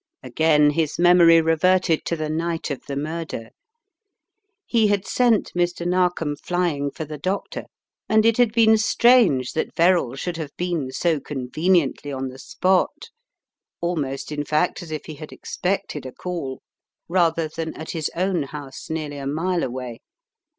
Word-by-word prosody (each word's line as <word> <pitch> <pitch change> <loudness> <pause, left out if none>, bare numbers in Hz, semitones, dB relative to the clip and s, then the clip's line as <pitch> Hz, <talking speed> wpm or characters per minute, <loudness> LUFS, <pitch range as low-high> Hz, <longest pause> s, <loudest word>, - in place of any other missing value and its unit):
Again 150 +3 +3
his 155 -1 -1
memory 170 -1 +6
reverted 165 +1 +2
to 170 - -1
the 155 -1 -3
night 165 0 -2
of 140 - -5
the 140 - -4
mur 155 +4 -3
der. 115 -8 -7 1.2
He 225 -3 +3
had 200 -1 0
sent 240 -4 +2
Mr. 175 0 -1
Narkom 175 -4 +1
flying 165 -4 -1
for 155 - -6
the 150 0 -8
doctor, 185 +6 -3 0.4
and 220 0 +4
it 230 -1 +4
had 245 -3 +4
been 220 -1 +5
strange 220 - +4
that 160 - -3
Verrall 170 -7 +3
should 170 +4 -4
have 150 -4 -7
been 170 -7 -2
so 165 +1 0
conveniently 145 +3 0
on 135 -1 -3
the 130 +1 -12
spot 190 - 0 0.3
— - - -68
almost, 150 -6 -3
in 150 -1 -2
fact, 155 +4 0
as 175 - -9
if 155 -1 -5
he 155 - -7
had 155 +1 -10
expected 180 -7 -3
a - - -7
call 165 -7 -5 0.2
— - - -65
rather 165 -2 +2
than 160 +1 -5
at 160 - -7
his 160 -3 -2
own 185 -1 0
house, 140 +1 -8
nearly 155 -2 -4
a 135 -1 -5
mile 170 +5 -1
away. 125 -2 -5
165 Hz, 165 wpm, -23 LUFS, 145-180 Hz, 1.2 s, memory